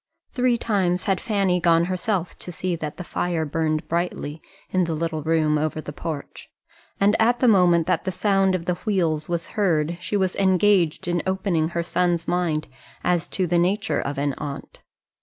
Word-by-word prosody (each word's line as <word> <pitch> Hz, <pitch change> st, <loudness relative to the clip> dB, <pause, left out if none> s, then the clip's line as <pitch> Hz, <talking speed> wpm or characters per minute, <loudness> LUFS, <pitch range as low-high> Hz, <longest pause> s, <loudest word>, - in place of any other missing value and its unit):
Three 250 Hz, -1 st, +2 dB
times 185 Hz, -6 st, 0 dB
had 195 Hz, -2 st, 0 dB
Fanny 195 Hz, -5 st, +1 dB
gone 170 Hz, 0 st, +4 dB
herself 185 Hz, 0 st, -2 dB
to 180 Hz, -, -5 dB
see 180 Hz, +1 st, -2 dB
that 155 Hz, -2 st, -6 dB
the 180 Hz, -, -5 dB
fire 170 Hz, -2 st, -1 dB
burned 155 Hz, +1 st, -1 dB
brightly 165 Hz, -3 st, -2 dB, 0.3 s
in 185 Hz, -1 st, +2 dB
the 165 Hz, -1 st, -2 dB
little 160 Hz, 0 st, -2 dB
room 155 Hz, -1 st, +2 dB
over 155 Hz, +1 st, -1 dB
the 150 Hz, -1 st, -7 dB
porch, 150 Hz, -2 st, -6 dB, 0.5 s
and 205 Hz, +2 st, +4 dB
at 240 Hz, +2 st, +3 dB
the 255 Hz, -, +3 dB
moment 180 Hz, -6 st, +5 dB
that 185 Hz, -, 0 dB
the 190 Hz, -, 0 dB
sound 195 Hz, 0 st, +2 dB
of 170 Hz, -2 st, -4 dB
the 180 Hz, -1 st, -1 dB
wheels 170 Hz, -8 st, 0 dB
was 170 Hz, -1 st, -2 dB
heard 170 Hz, -6 st, 0 dB
she 205 Hz, -, -1 dB
was 190 Hz, -2 st, 0 dB
engaged 190 Hz, -2 st, +3 dB
in 175 Hz, -1 st, 0 dB
opening 190 Hz, -4 st, 0 dB
her 170 Hz, -, +1 dB
son's 175 Hz, -1 st, 0 dB
mind 170 Hz, -4 st, 0 dB, 0.4 s
as 175 Hz, -2 st, +1 dB
to 185 Hz, -, -1 dB
the 175 Hz, 0 st, +2 dB
nature 200 Hz, +5 st, +1 dB
of 140 Hz, 0 st, -4 dB
an 140 Hz, 0 st, 0 dB
aunt. 140 Hz, -2 st, -7 dB
175 Hz, 185 wpm, -23 LUFS, 160-190 Hz, 0.5 s, moment